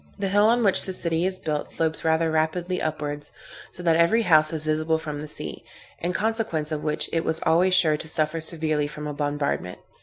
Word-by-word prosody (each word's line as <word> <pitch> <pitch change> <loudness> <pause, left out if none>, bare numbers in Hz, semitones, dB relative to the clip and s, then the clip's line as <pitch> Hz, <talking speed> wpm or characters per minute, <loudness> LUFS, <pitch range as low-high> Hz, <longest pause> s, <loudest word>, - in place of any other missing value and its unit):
The 195 -1 -2
hill 205 +2 +4
on 235 +1 +3
which 195 -3 +3
the 190 - -4
city 170 0 0
is 190 0 -2
built, 150 -4 -3
slopes 160 -1 -1
rather 160 0 +2
rapidly 170 +3 -1
upwards, 150 -1 -4 0.4
so 180 - -10
that 165 -2 +3
every 195 +8 +3
house 155 -4 +4
is 155 -1 -3
visible 155 +1 +1
from 150 -2 -6
the 150 - -6
sea, 150 - -4 0.4
in 175 - -2
consequence 215 -8 -1
of 150 -1 -2
which 150 -1 -1
it 165 0 +1
was 160 0 -1
always 180 +3 +3
sure 155 -4 +5
to 160 - -7
suffer 155 0 0
severely 155 -2 0
from 150 0 -8
a 150 - -4
bombardment. 145 -10 -2
160 Hz, 210 wpm, -24 LUFS, 155-180 Hz, 0.4 s, sure